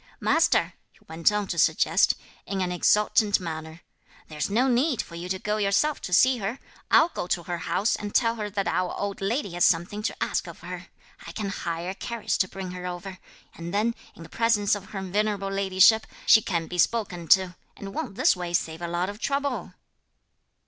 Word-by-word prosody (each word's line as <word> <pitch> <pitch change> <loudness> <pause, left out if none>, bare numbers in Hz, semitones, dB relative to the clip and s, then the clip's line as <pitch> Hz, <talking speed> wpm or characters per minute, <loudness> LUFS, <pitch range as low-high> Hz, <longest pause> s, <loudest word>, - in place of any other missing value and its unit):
"Master," - - +2 0.2
he - - -25
went 165 +4 +2
on 210 -1 -1
to 170 - -2
suggest, 160 +3 +3 0.3
in 195 -1 -3
an 180 -1 -1
exultant 210 +3 +3
manner, 160 -1 -7 0.5
"there's 150 +2 -3
no 240 +6 +2
need 255 +1 +2
for - - -4
you 170 +2 -6
to 190 - -1
go 210 +2 -2
yourself 210 +9 +1
to - - -6
see 255 +7 +5
her; 215 +5 -3 0.3
I'll 330 - +5
go 180 - -5
to 175 - -1
her 175 0 -4
house 205 +4 +1
and 205 0 -6
tell 230 -2 +3
her 210 -1 -3
that 195 -1 -2
our 180 -1 -1
old 200 -1 -3
lady 205 +1 -1
has 175 0 0
something 175 +5 +2
to 215 - -2
ask - - -1
of - - -10
her. - - -8 0.4
I - - -6
can 210 -3 -3
hire 170 -1 -4
a - - -6
carriage 230 +2 -3
to 185 - +2
bring 185 -1 -7
her 180 0 -6
over, 185 +1 -7 0.3
and 170 +3 -6
then, 225 +3 +1 0.2
in 165 - -11
the - - -12
presence 230 -3 +2
of 205 -2 -3
her 195 -1 -6
venerable 200 +1 -1
ladyship, 195 +3 +4 0.2
she 220 - +7
can 170 -5 -2
be 180 +1 -6
spoken 180 -6 0
to; 185 -2 -7 0.2
and 195 -1 -8
won't 195 - -4
this 255 - +4
way 175 -1 -5
save 165 -1 -1
a 170 - -3
lot 175 +2 -1
of 205 +1 -7
trouble?" 280 +2 -2
195 Hz, 205 wpm, -26 LUFS, 175-210 Hz, 0.5 s, she